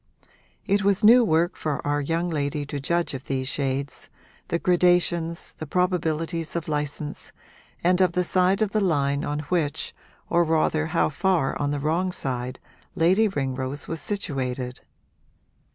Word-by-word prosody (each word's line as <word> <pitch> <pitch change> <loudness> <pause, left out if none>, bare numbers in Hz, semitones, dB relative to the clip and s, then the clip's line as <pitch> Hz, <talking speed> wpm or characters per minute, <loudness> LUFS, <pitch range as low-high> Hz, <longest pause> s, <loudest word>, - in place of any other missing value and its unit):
It 200 0 +2
was 200 +1 +2
new 240 +3 +8
work 170 -3 +2
for 150 -2 -3
our 145 0 +1
young 165 +4 -1
lady 145 -2 -2
to 145 0 -5
judge 170 +4 0
of 130 -1 -6
these 130 -1 -2
shades 140 0 -3 0.4
the 170 - 0
gradations, 175 -2 +2
the 155 - -8
probabilities 165 -2 -1
of 170 -2 -3
license, 150 0 -3 0.5
and 180 +2 +3
of 180 -2 +3
the 180 +1 +1
side 185 +3 +2
of 205 - -2
the 215 - +1
line 140 -6 +1
on 150 +1 -2
which, 155 -1 -1 0.3
or 170 0 +3
rather 160 -1 +1
how 165 +1 +1
far 170 -2 +1
on 145 - 0
the 145 0 -1
wrong 165 +6 0
side, 125 -5 -3 0.4
Lady 190 +6 +4
Ringrose 135 -4 -3
was 165 -2 -4
situated. 130 -10 -3
160 Hz, 150 wpm, -25 LUFS, 145-180 Hz, 0.5 s, new